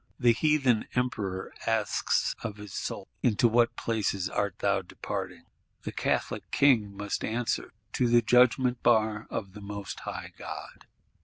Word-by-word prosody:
The 120 -2 +5
Heathen 135 -3 +2
Emperor 105 -7 -2
asks - - +1
of 105 -3 -5
his 105 -2 -9
soul: - - -4
Into 120 0 +3
what 120 +1 +3
places 105 -6 -1
art 100 -1 -1
thou 100 -1 +2
now - - -2
departing? 90 - -6 0.4
The - - -4
Catholic - - -1
King 110 -8 +3
must 105 0 -3
answer: 115 +2 -1 0.2
To 125 - +2
the 120 0 +5
Judgment 125 +1 +4
bar 110 -2 +2
of 95 -3 -4
the 105 - -10
Most 100 0 -6
High - - -6
God! - - -9
110 Hz, 150 wpm, -29 LUFS, 100-120 Hz, 0.4 s, The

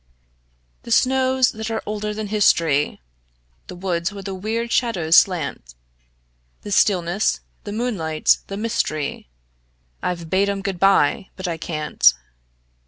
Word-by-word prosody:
The - - -12
snows 260 +1 +3
that 220 +1 -6
are 225 - -3
older 210 0 -3
than 210 -1 -5
history, 165 -8 +2 0.7
The - - -8
woods 175 0 -2
where 200 -1 -9
the 195 0 -5
weird 225 +5 -3
shadows 175 -11 +2
slant; 145 - +2 0.9
The 205 - -7
stillness, 190 0 +2 0.2
the 205 - -5
moonlight, 200 -9 +1
the 195 - -6
mystery, 155 - -2 0.7
I've 170 -2 -3
bade 195 +2 +2
'em 200 -1 -3
good 195 -3 -3
by 195 0 +3
but 185 -1 -5
I 170 -2 -3
can't. 155 - +2
195 Hz, 130 wpm, -21 LUFS, 170-215 Hz, 0.9 s, snows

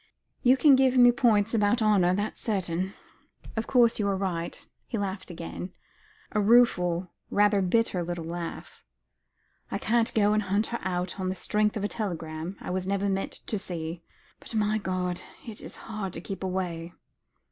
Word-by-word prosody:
"You 255 +2 +5
can 285 -1 +7
give 260 -1 +3
me 245 -1 +8
points 225 -4 +3
about 210 +1 +3
honour, 200 -5 +4
that's 205 +2 -3
certain. 190 -3 -1 0.6
Of 225 0 -2
course, 240 -3 +4
you 205 - +1
are 195 -1 +1
right," 175 -3 -3 0.2
he 230 - -3
laughed 195 -2 -4
again, 175 +1 -6 0.6
a 210 - +1
rueful, 190 -6 +4 0.2
rather 205 -1 +3
bitter 190 0 +1
little 175 -1 -4
laugh. 170 0 -6 0.9
"I - - -2
can't 230 0 +1
go 210 -1 +4
and 215 - +2
hunt 200 +2 +1
her 235 - -1
out 180 +1 -2
on 185 -1 -1
the 185 - -2
strength 210 +3 +1
of 205 - -3
a - - +2
telegram 170 -4 -4
I - - -5
was 185 0 -2
never 200 0 0
meant 195 0 -2
to 210 - -2
see. 170 -3 -5 0.4
But, - - -6
my 215 0 +2
God! 180 -2 -2 0.2
it 225 -3 -6
is - - -9
hard 215 -5 -4
to - - -6
keep 195 +1 -6
away." 175 -2 -3
195 Hz, 175 wpm, -27 LUFS, 180-215 Hz, 0.9 s, me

